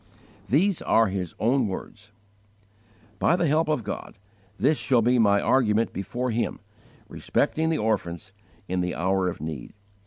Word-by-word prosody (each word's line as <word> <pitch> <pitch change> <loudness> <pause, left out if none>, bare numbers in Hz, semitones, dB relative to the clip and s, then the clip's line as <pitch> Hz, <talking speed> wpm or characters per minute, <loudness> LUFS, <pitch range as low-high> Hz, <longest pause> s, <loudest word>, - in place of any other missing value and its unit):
These 180 +7 +2
are 115 -2 +3
his 95 -3 -4
own 125 +1 +2
words: 105 +2 -8 1.1
"By 175 - +3
the 175 - +1
help 155 +2 +2
of 150 -6 0
God, 100 +1 -6 0.4
this 145 +4 +2
shall 125 -4 +2
be 125 +2 +3
my 100 -2 +4
argument 115 -2 +2
before 120 +6 -3
Him, 115 +1 -2 0.5
respecting 160 +1 0
the 160 - +1
orphans, 95 -4 -2 0.3
in 90 0 -1
the 90 0 -2
hour 95 +1 +1
of 90 - -4
need. 80 -5 -6
110 Hz, 150 wpm, -25 LUFS, 95-135 Hz, 1.1 s, my